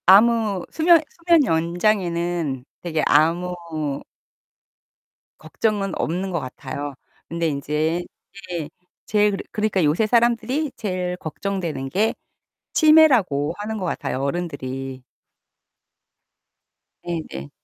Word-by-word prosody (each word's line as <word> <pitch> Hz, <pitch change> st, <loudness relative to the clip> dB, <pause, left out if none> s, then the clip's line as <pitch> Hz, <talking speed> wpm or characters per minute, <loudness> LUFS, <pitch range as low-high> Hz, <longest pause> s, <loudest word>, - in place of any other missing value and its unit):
아무 210 Hz, -1 st, +5 dB
수면 335 Hz, +1 st, +5 dB, 0.3 s
수면 335 Hz, -4 st, +6 dB
연장에는 170 Hz, -, 0 dB, 0.2 s
되게 160 Hz, -3 st, -1 dB
아무 165 Hz, -2 st, +1 dB, 1.4 s
걱정은 195 Hz, +4 st, -1 dB
없는 185 Hz, +4 st, -2 dB
것 170 Hz, -, 0 dB
같아요. 140 Hz, +1 st, -6 dB, 0.4 s
근데 170 Hz, 0 st, -1 dB
인제 155 Hz, +4 st, -1 dB, 0.5 s
예 165 Hz, -4 st, -3 dB, 0.4 s
제일 210 Hz, 0 st, +3 dB
그러 195 Hz, -, -4 dB
그러니까 210 Hz, -4 st, +1 dB
요새 155 Hz, +9 st, +2 dB
사람들이 240 Hz, +5 st, +2 dB
제일 180 Hz, -3 st, -3 dB
걱정되는 165 Hz, -5 st, -4 dB
게 210 Hz, +8 st, +1 dB, 0.6 s
치매라고 250 Hz, -, +5 dB
하는 215 Hz, +1 st, -4 dB
거 190 Hz, -, -4 dB
같아요 150 Hz, -6 st, -2 dB
어른들이. 135 Hz, -4 st, -4 dB, 2.0 s
네네. 155 Hz, -, -5 dB
175 Hz, 220 characters per minute, -22 LUFS, 155-210 Hz, 2.0 s, 수면